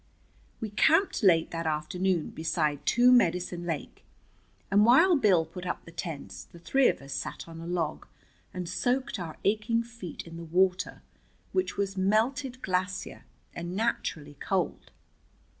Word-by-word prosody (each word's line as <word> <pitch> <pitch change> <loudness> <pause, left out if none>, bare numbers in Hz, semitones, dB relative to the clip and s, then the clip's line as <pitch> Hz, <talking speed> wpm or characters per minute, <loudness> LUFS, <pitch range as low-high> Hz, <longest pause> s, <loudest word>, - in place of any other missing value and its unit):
We 220 -2 -5
camped 325 - +3
late 170 -6 +4
that 165 -1 -3
afternoon 160 +3 -1
beside 160 -2 -1
Two 245 +1 +5
Medicine 180 -6 +2
Lake, 160 -4 -5 0.7
and 205 +1 +5
while 320 - +6
Bill 190 - +4
put 175 +3 -9
up - - -4
the 165 - -11
tents 140 - -6
the - - -16
three 265 +10 +3
of - - -1
us 135 0 -7
sat - - -5
on 165 0 -9
a 165 - -7
log 170 -3 -2 0.4
and 180 -2 -5
soaked 255 +3 -1
our 165 -3 -6
aching 220 +3 +1
feet 230 -8 -8
in 165 0 -9
the 170 - -7
water 180 +3 +1 0.5
which 370 - -1
was 195 -1 -2
melted 245 +7 0
glacier, 185 0 -2 0.3
and 175 +1 -5
naturally 165 -9 -2
cold. 185 -5 -2
185 Hz, 150 wpm, -28 LUFS, 165-230 Hz, 0.7 s, while